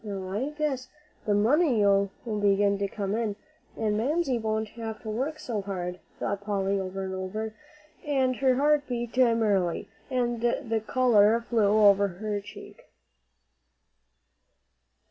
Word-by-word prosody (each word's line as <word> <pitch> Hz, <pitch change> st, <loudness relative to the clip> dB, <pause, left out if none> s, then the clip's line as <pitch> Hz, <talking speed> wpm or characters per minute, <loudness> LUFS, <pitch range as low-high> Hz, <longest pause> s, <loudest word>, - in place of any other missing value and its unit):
"Now 195 Hz, -3 st, -5 dB
I 235 Hz, +9 st, -1 dB
guess 295 Hz, -4 st, -3 dB, 0.4 s
the 205 Hz, -, +3 dB
money'll 210 Hz, -, +3 dB, 0.2 s
begin 205 Hz, -2 st, +2 dB
to 200 Hz, -, 0 dB
come 200 Hz, 0 st, -3 dB
in, 220 Hz, -2 st, -1 dB, 0.4 s
and 215 Hz, -2 st, 0 dB
Mamsie 270 Hz, +1 st, 0 dB
won't 220 Hz, -1 st, -2 dB
have 225 Hz, -1 st, -6 dB
to 220 Hz, -, -4 dB
work 270 Hz, +8 st, -2 dB
so 225 Hz, -8 st, -3 dB
hard," 180 Hz, -2 st, -4 dB, 0.2 s
thought 200 Hz, 0 st, -3 dB
Polly 200 Hz, -1 st, -1 dB
over 190 Hz, 0 st, -4 dB
and 190 Hz, 0 st, -4 dB
over, 210 Hz, +4 st, -4 dB, 0.5 s
and 265 Hz, -4 st, +1 dB
her 260 Hz, -1 st, +3 dB
heart 290 Hz, +2 st, +2 dB
beat 240 Hz, -1 st, -4 dB
merrily, 220 Hz, -8 st, +2 dB, 0.2 s
and 240 Hz, -3 st, -1 dB
the 235 Hz, -2 st, 0 dB
color 230 Hz, -3 st, +4 dB
flew 220 Hz, -4 st, +2 dB
over 200 Hz, 0 st, +6 dB
her 205 Hz, +3 st, -4 dB
cheek. -, -, -12 dB
220 Hz, 135 wpm, -27 LUFS, 200-250 Hz, 0.5 s, over